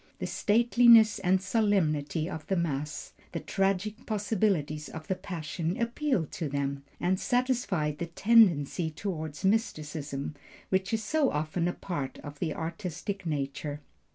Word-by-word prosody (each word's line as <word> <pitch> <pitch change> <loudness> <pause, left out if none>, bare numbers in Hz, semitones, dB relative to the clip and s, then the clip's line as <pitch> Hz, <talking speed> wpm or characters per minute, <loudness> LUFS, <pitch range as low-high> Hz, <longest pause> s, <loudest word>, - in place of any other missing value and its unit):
The - - -4
stateliness 230 -1 +5
and 190 0 +3
solemnity 170 -7 +1
of 160 -4 -6
the 190 - +1
Mass, 150 -3 -3 0.2
the - - -2
tragic 195 +3 -1
possibilities 195 -8 0
of 160 -1 -8
the - - +1
Passion, 170 -2 -4
appealed 235 - 0
to 160 - -3
them, 140 0 -2 0.2
and 185 +1 +1
satisfied 245 - 0
the 170 - -2
tendency 175 -5 +4
toward 155 -2 -4
mysticism, 155 -9 -1 0.4
which 190 0 +1
is 220 -1 0
so 290 +4 +2
often 155 +3 -1
a 175 - 0
part 145 -8 -4
of 145 0 -9
the 155 - -2
artistic 175 +3 -4
nature. 145 0 -3
175 Hz, 135 wpm, -29 LUFS, 150-210 Hz, 0.4 s, stateliness